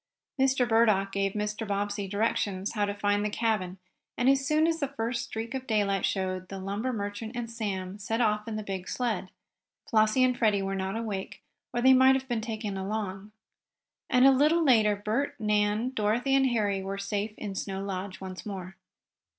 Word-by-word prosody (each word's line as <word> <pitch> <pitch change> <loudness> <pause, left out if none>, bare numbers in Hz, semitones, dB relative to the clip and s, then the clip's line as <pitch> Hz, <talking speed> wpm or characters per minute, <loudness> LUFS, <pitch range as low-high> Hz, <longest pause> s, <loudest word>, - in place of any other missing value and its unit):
Mr. 265 -2 +3
Burdock 215 -4 +3
gave 195 0 0
Mr. 210 +1 -3
Bobbsey 205 0 -2
directions 200 -1 -1
how 210 -2 0
to 205 - -2
find 205 0 +1
the 210 - 0
cabin, 210 -4 -1 0.4
and, 245 - +1
as 270 0 +3
soon 305 +3 +3
as 330 0 +1
the 280 - 0
first 235 -2 -3
streak 225 +1 -5
of 260 -1 -5
daylight 200 -3 +1
showed, 185 -1 -2
the 195 - -6
lumber 200 +6 -2
merchant 215 +1 -5
and 235 -1 -4
Sam 200 -4 -4
set 225 +3 -2
off 210 -2 +1
in 225 - -3
the 215 - -3
big 190 -2 -5
sled. 225 -7 -2 0.6
Flossie 220 +3 +3
and 255 -1 +3
Freddie 210 -5 +2
were 195 0 -2
not 190 +1 -2
awake, 195 -4 -5 0.3
or 240 - -1
they 260 0 +8
might 260 +1 +6
have 265 0 -3
been 240 -3 -1
taken 215 -3 -4
along. 195 0 -4 0.8
And 250 0 +5
a 270 - +9
little 305 +5 +4
later 220 -7 +4
Bert, 240 +8 -2
Nan, 210 +2 +1
Dorothy 235 +3 +1
and 270 -1 +4
Harry 205 -5 0
were 195 +1 -4
safe 205 +1 -3
in 205 -2 -5
Snow 195 0 -4
Lodge 195 -1 -5
once 185 -1 -7
more. 190 -3 -7
210 Hz, 190 wpm, -28 LUFS, 195-240 Hz, 0.8 s, a